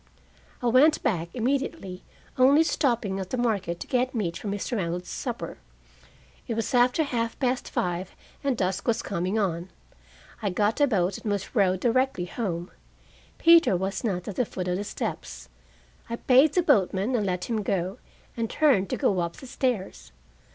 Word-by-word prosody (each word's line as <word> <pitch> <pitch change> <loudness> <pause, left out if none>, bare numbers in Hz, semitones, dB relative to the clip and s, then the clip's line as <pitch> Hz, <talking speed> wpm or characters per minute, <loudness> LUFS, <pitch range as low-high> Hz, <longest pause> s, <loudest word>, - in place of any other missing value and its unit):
I - - -1
went 265 +6 +5
back 170 -4 0
immediately, 250 - -2 0.3
only 275 +5 +6
stopping 235 -11 0
at 190 -1 -5
the 255 - -2
market 200 -8 -1
to - - -4
get 255 0 0
meat 180 -7 -1
for - - -6
Mr. 205 +4 -2
Reynolds' 180 -1 -3
supper. - - -5 0.9
It 230 - -2
was 225 +3 -2
after 250 +5 +4
half 230 -5 -2
past 255 -1 0
five 180 +1 -2 0.3
and 275 -4 0
dusk 190 0 -1
was 230 - +1
coming 185 +2 -2
on. 180 -4 -1 0.7
I 205 - 0
got 210 +7 0
a 290 - +6
boat 190 -5 0
and 210 - -3
was 200 -1 -3
rowed 190 -4 +2
directly 255 -5 +1
home. 175 -3 -4 0.7
Peter 335 - +6
was 190 +5 -3
not 185 -6 -2
at 205 - -6
the 250 - +3
foot 185 -3 -5
of 180 0 0
the 200 - -3
steps. 200 - -5 0.6
I 235 - -2
paid 265 +5 +4
the 360 - +3
boatman 205 - +2
and 230 -4 +1
let 180 -2 -2
him 225 -3 -1
go, 190 -1 -2 0.4
and 230 -1 -2
turned 255 - +3
to - - -1
go 190 - +1
up 170 -1 -2
the - - -11
stairs. 250 -6 -3
210 Hz, 175 wpm, -26 LUFS, 185-250 Hz, 0.9 s, only